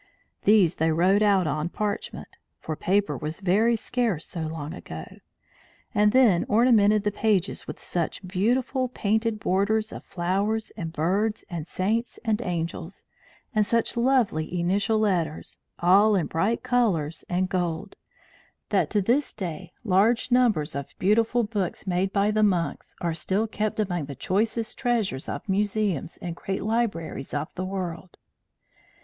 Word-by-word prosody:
These 205 -6 +5
they 160 0 +3
wrote 185 +6 +3
out 200 -4 +4
on 155 +2 -1
parchment 210 +2 -4 0.3
(for 155 - -4
paper 190 -2 +1
was 150 +6 -5
very 205 +5 +3
scarce 225 -7 -1
so 165 -3 -4
long 155 0 -5
ago), 80 - -8 0.9
and 210 0 +4
then 230 -8 +5
ornamented 215 -2 +4
the 210 - +1
pages 205 -3 0
with - - -7
such 175 +2 -3
beautiful 245 +7 +1
painted 220 -1 0
borders 215 +4 +1
of - - -8
flowers 200 +5 -1
and 165 -1 -5
birds 195 +7 0
and 165 -2 -4
saints 220 +7 -1
and 220 0 +1
angels, 170 -2 -4 0.5
and 215 -2 +3
such 230 +3 0
lovely 235 -10 +1
initial 200 +5 +1
letters, 180 -8 -1 0.2
all 200 +5 +5
in 180 -5 +1
bright 200 +8 0
colours 210 -12 +1
and 180 +1 +1
gold, 175 -3 -2 0.7
that - - +2
to 205 -2 +1
this 260 +8 +1
day 180 -2 -6
large 225 +5 +2
numbers 225 -12 +3
of 140 -1 -4
the - - -27
beautiful 225 +5 +2
books 205 -5 -3
made 190 +1 0
by 200 +1 +2
the 215 0 +1
monks 185 -5 0
are 170 -1 0
still 190 +7 0
kept 215 0 -2
among 175 -7 -1
the 140 0 -7
choicest 220 - -1
treasures 225 - -1
of 145 - -5
the 195 - -2
museums 205 -5 0
and 170 -2 -4
great 195 +2 -4
libraries 210 -11 -2
of 145 +2 -3
the 185 - -4
world. 185 -2 -5
195 Hz, 150 wpm, -26 LUFS, 170-220 Hz, 0.9 s, These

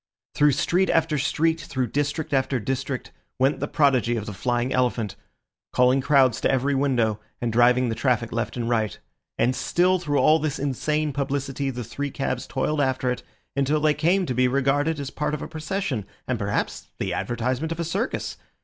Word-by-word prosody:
Through 150 -1 +4
street 180 +7 +1
after 160 -2 +2
street, 160 +3 +1
through 130 -4 -2
district 145 +2 -1
after 130 -1 +1
district, 130 +2 -3 0.3
went 135 +3 +2
the - - -2
prodigy 130 -6 +2
of 110 -3 -3
the 105 - -6
flying 120 +5 -1
elephant, 120 -5 0 0.6
calling 125 +2 +4
crowds 130 -3 +3
to - - +2
every 135 +2 +1
window, 125 -6 +1 0.2
and 120 -2 -2
driving 125 +2 +4
the - - 0
traffic 120 -1 0
left 115 +2 -2
and 115 -1 -2
right. 110 -4 0 0.4
And 125 +2 +2
still 180 +5 +2
through 145 -4 -1
all 155 +2 +5
this 150 -2 -2
insane 150 +2 -1
publicity 140 0 -2
the 125 -2 -4
three 140 +6 -4
cabs 130 -2 -3
toiled 145 +3 0
after 130 -2 +1
it, 125 - -3 0.3
until 140 +2 +2
they 150 0 +3
came 175 +6 +2
to 130 - -2
be 125 +1 +3
regarded 140 +4 +1
as 140 -1 -5
part 150 0 -1
of 150 - -6
a - - -5
procession, 160 - -3 0.2
and 125 -3 -1
perhaps 100 - -2
the - - -2
advertisement 125 +6 -2
of 165 - -4
a - - 0
circus. 195 +9 -2
135 Hz, 185 wpm, -24 LUFS, 125-150 Hz, 0.6 s, all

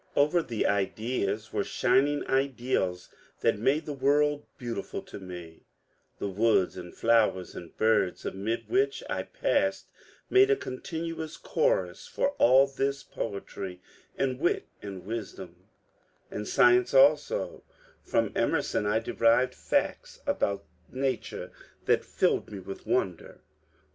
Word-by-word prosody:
Over 150 +5 +4
the 115 -8 -2
ideas 105 +1 -1
were - - +1
shining 145 +2 +2
ideals 125 -9 0 0.3
that - - +2
made 135 +7 +2
the 150 - -4
world 145 +2 +2
beautiful 120 -2 -5
to - - -10
me; 90 -3 -10 0.5
the - - -3
woods 100 -1 +2
and 90 -1 -8
flowers 115 -5 +2
and 85 - -10
birds 110 -4 +2
amid 105 +5 -3
which 405 +3 +1
I - - 0
passed - - 0 0.4
made 390 +1 +5
a 420 - +5
continuous 160 - -5
chorus - - 0
for 475 - 0
all 130 +3 +7
this 135 0 -2
poetry 100 -3 -6 0.4
and 130 -1 0
wit 170 - +1 0.2
and 95 -3 -7
wisdom^' 110 +1 -7 0.6
And 105 - -4
science 125 +2 +4
also; 145 +2 +3 0.4
from - - +1
Emerson 105 - +1
I 105 +1 +2
derived 115 +2 +2
facts - - -1
about 100 -1 0 0.2
nature 135 0 -3 0.3
that - - +3
filled - - 0
me 105 - -6
with 95 +1 -9
wonder. 95 -9 -1
120 Hz, 125 wpm, -28 LUFS, 100-145 Hz, 0.6 s, all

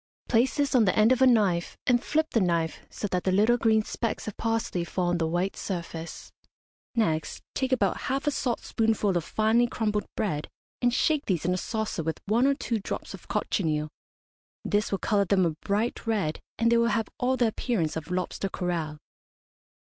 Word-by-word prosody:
Place 245 +2 +3
this 285 -1 +1
on 240 -4 +5
the 185 - +2
end 215 +3 +5
of 255 0 +3
a 260 - +7
knife 200 -8 +2
and 245 0 +3
flip 315 +1 0
the 230 - +2
knife 170 -3 0
so - - -5
that 180 -1 -1
the 190 - +1
little 215 +5 +4
green 220 -2 +3
specks 230 +1 -3
of 215 - -4
parsley 225 -6 -1
fall 175 +1 -1
on 175 0 0
the 160 - +1
white 175 +4 -1
surface. 170 -3 -6 0.6
Next 160 -9 0
take 260 -1 -1
about 210 -7 +2
half 270 +2 -1
a 295 - +2
saltspoonful 225 -6 0
of 175 - +1
finely 220 +5 +2
crumbled 210 -3 -1
bread, 155 -8 -1 0.3
and 245 -1 +3
shake 300 +4 +1
these 175 -5 0
in 180 - +2
a - - 0
saucer 220 -2 -2
with 160 0 -3
one 230 +6 +3
or 280 - +3
two 235 -5 -2
drops 200 - -5
of - - -11
cochineal. 155 -4 -1 0.8
This 210 0 +1
will 195 - +1
colour 200 0 +1
them 190 -1 +3
a 165 - +2
bright 215 +3 -1
red, 200 -9 0 0.2
and 230 0 +3
they 235 - +5
will 235 0 +3
have 225 -1 0
all 260 +1 +1
the 245 - +3
appearance 215 - -1
of 160 -2 -5
lobster 185 +2 -2
coral. 170 -5 -2
210 Hz, 195 wpm, -27 LUFS, 175-235 Hz, 0.8 s, a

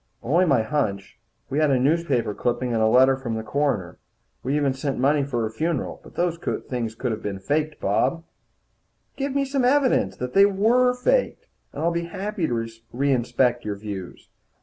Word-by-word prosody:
"Only 170 +9 +3
my 135 -9 +3
hunch. 110 -7 -2 0.3
We 140 - 0
had 155 -1 +3
a 135 - +3
newspaper 135 -5 +1
clipping, 120 +2 -1
and 115 - +1
a 110 - +4
letter 130 +4 +5
from 125 -4 -4
the 110 - -4
coroner. 110 -7 -1 0.4
We 135 +3 -1
even 145 -3 +1
sent 135 +1 -3
the - - -4
money 145 +1 +3
for 125 -4 -2
her 110 - -2
funeral. 155 +4 -2
But - - -15
those 170 -1 0 0.3
things 115 -3 -3
could 115 -2 -3
be 100 -2 -4
faked, 150 +9 -1
Bob." 135 +12 0 0.9
"Give 275 0 -3
me 280 0 +2
some 270 -1 -1
evidence 265 +1 +2
that 125 0 -5
they 200 +1 +7
were 235 +6 +3
faked, - - 0 0.3
and - - -5
I'll 170 - +2
be 170 0 -2
happy 195 0 -3
to 115 -1 -2 0.2
reinspect 125 -2 +1
your 105 -1 -3
views." 100 -3 -8
135 Hz, 185 wpm, -24 LUFS, 115-170 Hz, 0.9 s, they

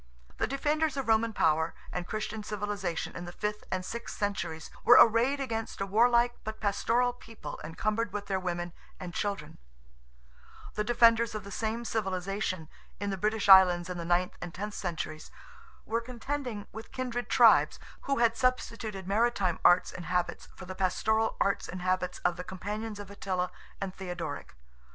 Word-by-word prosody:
The - - +1
defenders 295 +2 0
of 270 - -2
Roman 225 0 +3
power 160 -4 +2 0.2
and 180 0 -4
Christian 215 0 -3
civilization 205 -4 -3
in 175 - -5
the 175 - -7
fifth 210 +3 -3
and 185 -1 -2
sixth 235 +4 -6
centuries, 170 -6 -3
were 240 - +8
arrayed 235 +5 +5
against 225 -5 -3
a 195 - 0
warlike 235 +4 +3
but 220 0 -6
pastoral 230 +4 +1
people 230 -2 -9
encumbered 210 +7 -1
with 205 0 -4
their 195 -1 -1
women 175 -1 -3 0.3
and 180 -2 -6
children; 200 +1 -3 1.1
the 210 - -1
defenders 230 -1 +4
of 210 - -4
the 200 - -9
same 225 +3 -2
civilization, 190 -4 -2 0.3
in 200 0 -2
the - - -1
British 210 +2 0
Islands 185 -2 +7
in 180 - -4
the - - -3
ninth 175 +2 +1
and 175 - -5
tenth 210 +2 -4
centuries, 170 -4 -4 0.6
were 230 +1 0
contending 245 -2 -4
with 220 +1 -9
kindred 250 -2 -3
tribes, - - +6 0.3
who 275 0 +1
had 235 -1 +3
substituted 225 -6 -1
maritime 200 -4 +1
arts 175 +1 +5
and 175 - -8
habits 180 +1 -1
for 185 - -10
the 185 - -6
pastoral 220 +4 +1
arts 200 - +1
and 180 0 -6
habits 185 0 0
of 180 -1 +2
the 180 - -5
companions 210 +4 -5
of 200 -1 -8
Attila 185 -2 -2 0.3
and 195 -1 -4
Theodoric. 175 -6 -6
205 Hz, 165 wpm, -30 LUFS, 185-230 Hz, 1.1 s, were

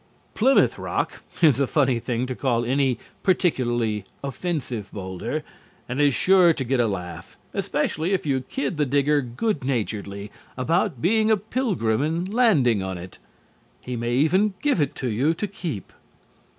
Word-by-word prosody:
"Plymouth 265 +5 +3
Rock" - - -2 0.2
is 145 -5 +6
a 140 - +2
funny 130 -5 +2
thing 120 +1 -2
to 130 - -3
call 120 -2 0
any 130 0 +1 0.2
particularly 120 - +1 0.2
offensive 135 - -3
boulder, 100 - -4 0.4
and 125 +3 -1
is 145 -3 +4
sure 185 -3 +5
to 140 - -3
get 130 +1 0
a 120 - +3
laugh, 90 -4 -6 0.2
especially 160 +5 -1
if 190 -4 0
you 135 -3 +1
kid 185 - -3
the 150 - +2
digger 145 +2 +2
good 140 - -2
naturedly 105 -5 -3 0.3
about 160 - 0
being 215 +4 +3
a 220 - +5
Pilgrim 195 - 0
and 170 +6 -1
landing 145 - +4
on 95 -1 -4
it. 90 +1 -10 0.7
He 125 - -3
may 120 +1 -1
even 185 +9 +3
give 285 - +2
it 140 - -1
to 130 - -3
you 130 +9 +1
to 210 - -2
keep. 170 - -6
135 Hz, 160 wpm, -24 LUFS, 120-175 Hz, 0.7 s, is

